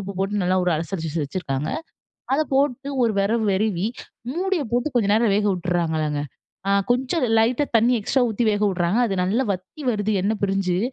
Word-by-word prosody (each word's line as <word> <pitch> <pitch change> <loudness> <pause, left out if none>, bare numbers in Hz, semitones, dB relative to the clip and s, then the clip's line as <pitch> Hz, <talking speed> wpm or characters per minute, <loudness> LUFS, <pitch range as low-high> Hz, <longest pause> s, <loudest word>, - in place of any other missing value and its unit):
உப்பு 195 0 -6
போட்டு 195 +1 0
நல்லா 185 +1 +2
ஒரு 180 - +2
அலசரிச்சு 165 -1 -3
வச்சுருக்காங்க. 145 -1 -3 0.6
அத 295 - +2
போட்டு 275 0 +1
ஒரு 225 -3 +1
வேறவு 220 +3 +1
வெரவி, 195 -1 0 0.5
மூடியை 365 -4 0
போட்டு 245 +5 0
கொஞ்ச 215 -4 +2
நேரம் 220 -3 +3
வேக 210 0 +1
உட்டர்றாங்கங்க. 160 -4 -1 0.5
அ - - +2 0.2
கொஞ்சம் 265 +7 -1 0.2
லைட்டா 235 +5 +2
தண்ணி 235 +3 +4
எக்ஸ்ட்ரா 255 +5 +1
ஊத்தி 220 +2 -1
வேக 205 0 -1
உட்றாங்க. 175 +4 0
அது 195 - -1
நல்லா 220 +8 +1
வத்தி 185 - -8
வருது 210 -2 -1
எண்ண 205 +3 +1
பிரிஞ்சு, 195 -2 0
200 Hz, 170 wpm, -23 LUFS, 180-240 Hz, 0.6 s, தண்ணி